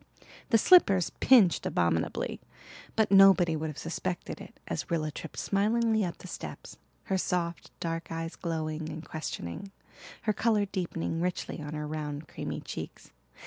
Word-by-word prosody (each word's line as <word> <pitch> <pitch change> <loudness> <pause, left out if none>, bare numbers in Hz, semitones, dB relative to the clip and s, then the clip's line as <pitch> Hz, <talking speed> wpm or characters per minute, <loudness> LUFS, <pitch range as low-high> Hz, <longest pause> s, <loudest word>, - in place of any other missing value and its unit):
The 225 - +6
slippers 200 - +6
pinched 215 - +6
abominably, 85 -2 0 0.5
but 220 -2 +2
nobody 195 -4 +7
would 155 +1 -2
have 150 - -8
suspected 175 +2 -4
it - - -12
as 140 -5 -3
Rilla 155 -2 0
tripped 160 +1 -8
smilingly 220 +2 +2
up 175 -2 -3
the - - -11
steps, - - -8 0.2
her 190 -1 0
soft 175 -2 -2
dark 165 0 -3
eyes 165 0 -4
glowing 160 -2 -3
and 160 +1 -7
questioning, 155 - -5 0.5
her 215 - +2
colour 215 -2 +2
deepening 170 -4 -3
richly 180 -2 -2
on 150 +1 -5
her 150 0 -3
round, 150 0 -4
creamy - - -5
cheeks. - - -8
170 Hz, 145 wpm, -29 LUFS, 155-195 Hz, 0.5 s, nobody